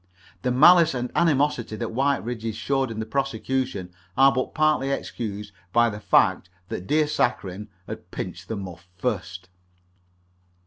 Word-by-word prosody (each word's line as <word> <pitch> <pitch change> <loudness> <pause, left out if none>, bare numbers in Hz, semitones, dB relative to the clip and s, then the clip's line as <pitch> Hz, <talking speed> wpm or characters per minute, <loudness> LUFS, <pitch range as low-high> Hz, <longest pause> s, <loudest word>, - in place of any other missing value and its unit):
The 125 - 0
malice 160 +5 +6
and 125 0 -3
animosity 145 -8 +1
that 115 +1 -4
Whiteridge's 120 -4 -1
showed 135 +3 0
in 110 -1 -5
the 110 - -2
prosecution 130 -5 -2 0.2
are 135 +1 +7
but 130 +1 -2
partly 155 -3 +2
excused 105 -6 -4 0.2
by 120 +2 +4
the 105 - -7
fact 90 - +3 0.2
that 90 - -5
dear 155 +1 +3
Saccharine 105 -8 -1 0.2
had - - -8
pinched - - -6
the 110 - -3
muff 90 -3 -8
first. 90 -4 -3
120 Hz, 140 wpm, -24 LUFS, 105-135 Hz, 0.2 s, are